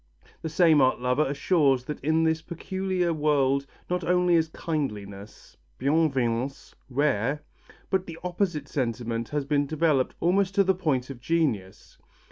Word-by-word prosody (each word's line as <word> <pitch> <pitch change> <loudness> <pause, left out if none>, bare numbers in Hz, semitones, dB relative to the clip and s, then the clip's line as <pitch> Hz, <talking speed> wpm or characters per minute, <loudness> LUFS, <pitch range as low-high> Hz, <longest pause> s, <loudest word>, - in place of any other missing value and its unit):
The 160 - -3
same 160 -2 +4
art 130 -1 +3
lover 125 +4 +1
assures 140 -2 +2
us - - -23
that 150 0 -5
in 160 +2 +2
this 160 0 +1
peculiar 185 +1 -2
world 140 -3 +1 0.2
not 180 0 -1
only 180 +1 +2
is 160 -1 +3
kindliness 105 -12 -5 0.2
(bienveillance) 135 -4 0 0.2
rare, 135 0 0 0.5
but 190 -1 0
the 165 -1 -7
opposite 175 -5 -2
sentiment 115 -3 -2
has 145 -2 -2
been 145 0 +1
developed 155 -3 +1
almost 190 +2 +1
to 200 - +5
the 190 0 +3
point 140 -8 -1
of 125 -3 -10
genius. 125 - -2
150 Hz, 145 wpm, -26 LUFS, 130-170 Hz, 0.5 s, to